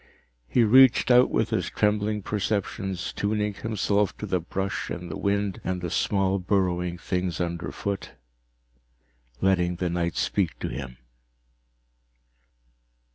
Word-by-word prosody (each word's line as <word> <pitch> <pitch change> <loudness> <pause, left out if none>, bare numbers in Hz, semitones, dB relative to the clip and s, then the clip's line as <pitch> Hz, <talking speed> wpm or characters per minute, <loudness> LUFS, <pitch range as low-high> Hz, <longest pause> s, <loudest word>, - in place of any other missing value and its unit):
He 120 - +3
reached 130 +3 +6
out 125 +1 +6
with - - 0
his - - 0
trembling 105 0 0
perceptions, 95 -3 -2
tuning 105 0 -1
himself 105 -1 0
to - - -5
the 95 -3 0
brush 95 +2 -3
and 90 0 -5
the - - -4
wind 100 -1 -1
and 95 -1 -2
the 90 -2 -4
small 95 -1 +1
burrowing 90 -2 0
things 90 -2 -2
underfoot, 85 +3 -3 1.3
letting 90 -2 +2
the 90 0 -2
night 85 -2 -1
speak - - 0
to - - -4
him. 65 -3 -6
95 Hz, 125 wpm, -26 LUFS, 90-105 Hz, 1.3 s, reached